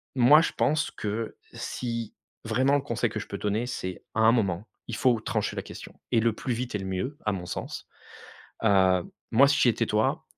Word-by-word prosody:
moi 135 +5 +7
je - - 0
pense 155 +1 +1
que 110 +2 -4 0.2
si, 115 -3 -4 0.3
vraiment 135 +2 +2
un 145 - +2
conseil 120 -5 -1
que - - -4
je - - -6
peux - - -6
donner, 105 +3 0
c'est 95 -7 -5
à - - -2
un 110 - +7
moment 100 -4 0 0.2
il 115 - -4
faut 120 -2 +3
trancher - - -2
la - - -2
question - - -11
et 115 - +4
le 115 -1 +2
plus 125 - -3
vite 125 +1 -4
est 105 - -1
le 95 - -5
mieux 95 +10 -3
à 105 - +2
mon 95 -3 -4
sens. - - -6 0.8
Heu, 95 -4 +4 0.3
moi 135 +5 +6
si 140 - +2
j'étais 115 -1 +3
toi, 105 +1 +1
115 Hz, 210 wpm, -27 LUFS, 105-125 Hz, 0.8 s, moi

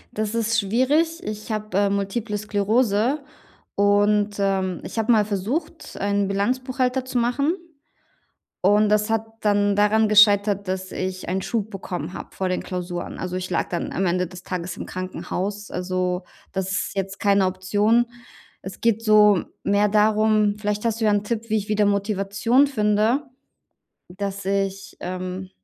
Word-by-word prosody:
Das 215 0 -2
ist 230 0 +1
schwierig. 290 - +1
Ich 215 -4 -6
habe, 215 -3 -2
äh, 200 0 +3
Multiple 200 +2 -2
Sklerose 215 +5 +1 0.6
und, 205 +1 +3
ähm, 190 -2 0
ich - - -8
habe 225 +1 +2
mal 215 -3 +4
versucht, 235 - -3
einen 200 0 +1
Bilanzbuchhalter 255 +5 0
zu 255 -1 -3
machen. 280 +7 +1 1.1
Und 210 +3 +4
das 210 +1 +2
hat 225 -1 +1 0.2
dann 205 -1 +2
daran 215 +1 +3
gescheitert, 205 -1 +5
dass 185 0 -3
ich 185 -1 -4
einen 185 +2 0
Schub 220 0 -2
bekommen 180 -3 -5
habe - - -9
vor 190 - -2
den 185 - -2
Klausuren. 180 -1 -5
Also, 180 0 -4
ich 185 0 -4
lag - - -1
dann 175 - -3
am 190 - 0
Ende 180 +1 +1
des 180 +1 -11
Tages 180 -2 -4
im - - -6
Krankenhaus. 190 +2 -4
Also, 180 0 -2 0.3
das 190 0 -2
ist 195 - -2
jetzt 195 +1 -3
keine 200 -2 +3
Option. 205 +6 +2 0.6
Es - - -8
geht 230 -1 +1
so 210 -3 +5 0.2
mehr 205 +1 +2
darum 215 0 +3
vielleicht 210 0 -2
hast 230 0 0
du - - 0
ja 210 - +4
'n 205 -1 +2
Tipp, 230 +1 -3
wie 220 0 +2
ich 205 - -6
wieder 210 -1 +2
Motivation 205 +5 +2
finde, 215 +1 +1 0.9
dass 200 +2 -5
ich, 195 0 -2
ähm, 185 +1 -5
205 Hz, 160 wpm, -23 LUFS, 190-220 Hz, 1.1 s, gescheitert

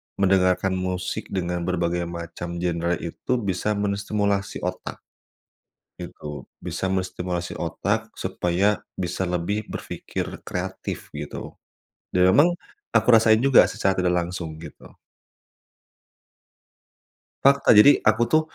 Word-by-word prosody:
mendengarkan 95 -1 +2
musik 90 0 -3
dengan 90 -2 -2
berbagai 85 -1 0
macam 85 0 -6
genre 85 0 0
itu 85 +8 -6 0.2
bisa 105 +4 0
menstimulasi 100 0 -1
otak, 90 +1 -5 0.9
gitu. 75 -1 -8 0.2
Bisa - - -4
menstimulasi 90 -2 -2
otak 105 +7 -2
supaya 95 +2 0 0.2
bisa 90 +1 -3
lebih 90 +4 -2
berfikir - - -5 0.2
kreatif, 95 +1 -5
gitu. 75 0 -7 0.6
Dan 90 0 +4
memang 145 - +6 0.5
aku - - +2
rasain 110 -1 +6
juga 135 -2 +6
secara 95 - 0
tidak 90 -1 +2
langsung, 85 -3 -6
gitu. 80 - -12 2.5
Fakta. 140 -3 +5
Jadi 140 +8 +8
aku 110 +2 +4
tuh, 155 - +5
95 Hz, 105 wpm, -24 LUFS, 85-100 Hz, 2.5 s, Jadi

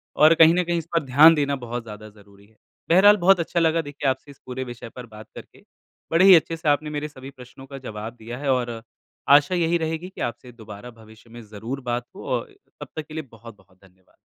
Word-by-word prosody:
और 155 +2 +6
कहीं 165 0 +6
न 180 - +1
कहीं 175 0 -2
इस 165 - -4
पर 165 - +2
ध्यान 150 +5 +6
देना 140 -1 0
बहुत 120 -2 -6
ज़्यादा 110 -1 -11
ज़रूरी 100 -1 -20
है। 110 - -29 0.3
बहरहाल, 200 +5 +6
बहुत 190 0 +4
अच्छा 170 +1 -1
लगा 165 0 +2
देखिए 145 -2 -3
आपसे 130 +2 -5
इस 140 - -19
पूरे 130 +1 -5
विषय 120 -2 -9
पर 125 +2 -11
बात 110 -1 -14
करके। - - -14 0.5
बड़े 170 +3 +4
ही 190 -2 +9
अच्छे 165 0 +1
से 155 -2 -1
आपने 150 +1 0
मेरे 150 0 -4
सभी 135 -2 -12
प्रश्नों 130 0 -14
का 135 0 -9
जवाब 110 -3 -8
दिया 120 +2 -8
है 140 0 -4
और, 120 -3 -4 0.5
आशा 145 +5 +5
यही 170 -1 +1
रहेगी 160 +2 -4
कि - - -11
आपसे 120 +1 -5
दोबारा 110 0 -12
भविष्य 110 0 -18
में 120 +1 -11
ज़रूर 110 +6 -7
बात 120 -1 -3
हो - - -11
और - - -3 0.3
तब - - -7
तक 155 - -5
के 155 - -12
लिए 155 0 -5
बहुत-बहुत 110 -5 -16
धन्यवाद। 95 0 -28
130 Hz, 230 wpm, -23 LUFS, 115-160 Hz, 0.5 s, ही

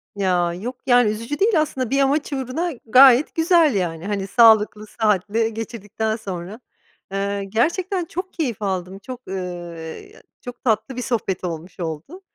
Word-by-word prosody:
Ya, 180 -3 +1
yok, 230 +9 -5
yani, 245 -3 +5
üzücü 230 +7 -5
değil 395 -6 +4
aslında 260 -5 -2
bir 275 +1 +1
amaç 285 +2 +1
uğruna 270 +7 -2
gayet 255 +3 +6
güzel, 325 - +4
yani, 175 -1 -2
hani, 200 -2 -2
sağlıklı, 215 -1 +4
sıhhatli 215 +1 0
geçirdikten 220 -1 -3
sonra. 195 0 -7 0.5
Iıı, 200 0 -2
gerçekten 340 - 0
çok 365 +3 -6
keyif 245 - -3
aldım, 190 -1 -3
çok, 250 +4 -9
ııı, 175 -3 -6 0.4
çok 245 -1 -10
tatlı 230 +2 0
bir 250 - -3
sohbet 220 -7 -2
olmuş 170 +1 -6
oldu. 170 - -6
220 Hz, 145 wpm, -21 LUFS, 190-265 Hz, 0.5 s, gayet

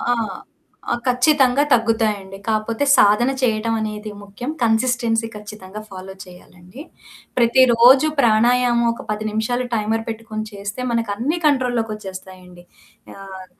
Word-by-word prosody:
ఆ! 245 - 0 0.8
ఆ! - - +2
ఖచ్చితంగా 260 +1 +3
తగ్గుతాయండి. 220 -4 0
కాకపోతే 220 +4 -1
సాధన 210 +5 +4
చేయడం 225 -2 0
అనేది 215 0 -5
ముఖ్యం. 205 +7 -7
కన్సిస్టెన్సీ 230 0 +1
ఖచ్చితంగా 210 -1 -10
ఫాలో 190 0 -9
చేయాలండి. 180 +4 -15 0.6
ప్రతిరోజు 250 +2 +5
ప్రాణాయామం 240 +1 +3
ఒక 230 - -9
10 210 0 -3
నిమిషాలు 220 +4 -1
టైమర్ 220 +1 -1
పెట్టుకొని 220 -1 -5
చేస్తే, 200 +3 -7
మనకన్నీ 230 +7 -1
కంట్రోల్‌లోకొచ్చేస్తాయండి. 200 -9 -3 0.5
ఆహ్! 190 -1 -10
225 Hz, 105 wpm, -20 LUFS, 205-245 Hz, 0.8 s, ప్రతిరోజు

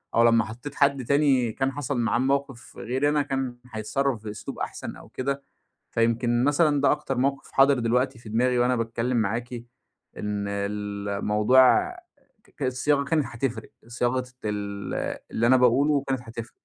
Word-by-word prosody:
أو 115 - +5
لمّا 115 -1 +4
حطيت 125 +6 -8
حد 140 -3 +2
تاني 135 -4 +3
كان 135 +4 -1
حصل 140 -1 -3
معاه 115 -1 +1
الموقف 135 -1 -2
غيري 130 +4 0
أنا، 150 0 +2
كان 135 -3 -3
هيتصرف 115 +3 -1
في 110 - -5
أسلوب 105 - -8
أحسن - - -5
أو - - -14
كده، 140 +2 -3 0.5
فيمكن 120 +1 +1
مثلًا 145 0 +3
ده 140 - +4
أكتر 150 -3 -2
موقف 135 +2 -1
حاضر 135 -1 +4
دلوقتي 125 +2 0
في 115 - -11
دماغي 125 +3 +2
وأنا 125 +1 +3
باتكلّم 115 +1 -1
معاكِ 115 +3 -1 0.6
إن 105 -1 -3
الموضوع، 105 - +2 0.7
ك 145 - -4
الصياغة 135 +3 +1
كانت 150 0 +1
هتفرق، 120 -2 -4 0.2
صياغة 120 +2 -1 0.2
ال 100 -1 -3
اللي 115 - +1
أنا 130 +1 +6
باقوله 135 +4 +3
كانت 135 -2 -1
هتفرق. 115 0 -8
125 Hz, 155 wpm, -25 LUFS, 115-140 Hz, 0.7 s, أنا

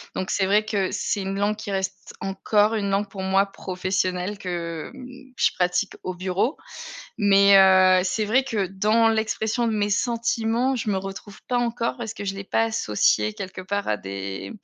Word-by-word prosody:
donc 185 - -3
c'est 195 - +1
vrai 205 +3 +3
que, 205 -3 -1
c'est 205 - -2
une 195 +1 -3
langue 205 +1 0
qui 215 - -7
reste 190 0 -4
encore 205 +2 +1
une 200 -2 -1
langue 195 +1 0
pour 195 -1 -6
moi 190 +1 +3
professionnelle, 185 0 -2
que, 170 -4 -5
mmh, 260 0 -12
je - - +3
pratique 180 +2 0
au 185 - -3
bureau. 185 - -1 0.6
Mais, 200 -1 +6
heu, 185 -1 +6
c'est 215 +3 0
vrai 240 +6 +3
que 220 -7 -1
dans 215 +4 +2
l'expression 220 +1 0
de - - 0
mes 205 0 0
sentiments, 235 +3 0
je 225 - -3
me 200 - +1
retrouve 195 +1 -7
pas 245 - 0
encore, 235 0 -1
parce 220 -2 -5
que 205 - -7
je 195 0 -2
l'ai 195 0 -7
pas 225 - +1
associé 105 - +1
quelque 185 -1 -7
part 200 +2 -3
à 105 - 0
des 95 0 -6
200 Hz, 190 wpm, -24 LUFS, 185-220 Hz, 0.6 s, Mais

